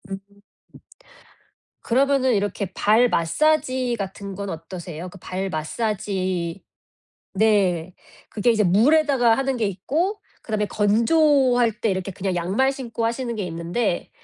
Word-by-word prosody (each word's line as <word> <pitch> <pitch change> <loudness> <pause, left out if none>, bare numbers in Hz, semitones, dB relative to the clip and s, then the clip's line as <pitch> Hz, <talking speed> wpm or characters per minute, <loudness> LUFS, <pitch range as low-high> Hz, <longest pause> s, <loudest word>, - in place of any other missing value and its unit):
음 195 - -4 1.6
그러면은 260 0 +2
이렇게 200 -2 -2
발 220 +6 +3
마사지 255 - +1
같은 195 0 -6
건 200 0 -5
어떠세요? 170 0 -7
그 195 - -13
발 185 +2 -4
마사지 185 0 -2 0.7
네. 190 -5 +2 0.4
그게 220 +3 +1
이제 215 -2 +2
물에다가 245 - +4
하는 270 -1 -1
게 225 - 0
있고 305 - -1 0.2
그다음에 215 -2 -1
건조할 245 +2 +3
때 225 - +1
이렇게 190 0 -2
그냥 190 0 -3
양말 195 +10 +1
신고 235 -4 -4
하시는 235 +1 -2
게 210 - -3
있는데 175 +4 -2
210 Hz, 260 characters per minute, -23 LUFS, 185-245 Hz, 1.6 s, 물에다가